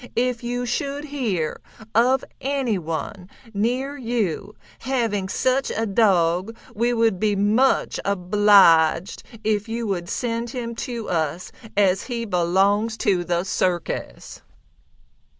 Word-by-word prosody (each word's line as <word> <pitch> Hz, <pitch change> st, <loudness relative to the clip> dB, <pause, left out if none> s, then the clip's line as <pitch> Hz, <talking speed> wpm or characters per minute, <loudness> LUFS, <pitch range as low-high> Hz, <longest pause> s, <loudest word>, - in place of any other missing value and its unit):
If 245 Hz, 0 st, 0 dB
you 245 Hz, +1 st, -2 dB
should 280 Hz, +4 st, -2 dB
hear 225 Hz, -, -2 dB, 0.3 s
of 250 Hz, +4 st, +3 dB, 0.2 s
anyone 195 Hz, -, -3 dB, 0.2 s
near 250 Hz, +7 st, -1 dB
you 220 Hz, -5 st, -2 dB, 0.2 s
having 225 Hz, -7 st, -1 dB
such 260 Hz, +5 st, +1 dB
a 225 Hz, -, -1 dB
dog 195 Hz, -1 st, +2 dB, 0.2 s
we 235 Hz, +3 st, +1 dB
would 225 Hz, -5 st, +1 dB
be 210 Hz, 0 st, +1 dB
much 215 Hz, +7 st, +2 dB
obliged 190 Hz, -3 st, +4 dB, 0.2 s
if 215 Hz, 0 st, 0 dB
you 230 Hz, +1 st, -3 dB
would 180 Hz, -4 st, -3 dB
send 235 Hz, -1 st, -2 dB
him 235 Hz, -1 st, -5 dB, 0.2 s
to 235 Hz, -3 st, -5 dB
us 165 Hz, +1 st, -2 dB, 0.3 s
as 195 Hz, -2 st, +3 dB
he 235 Hz, -2 st, -3 dB
belongs 200 Hz, +4 st, +1 dB
to 190 Hz, -6 st, +1 dB
the 175 Hz, 0 st, -1 dB
circus." 175 Hz, -, -3 dB
210 Hz, 115 wpm, -23 LUFS, 185-240 Hz, 0.3 s, obliged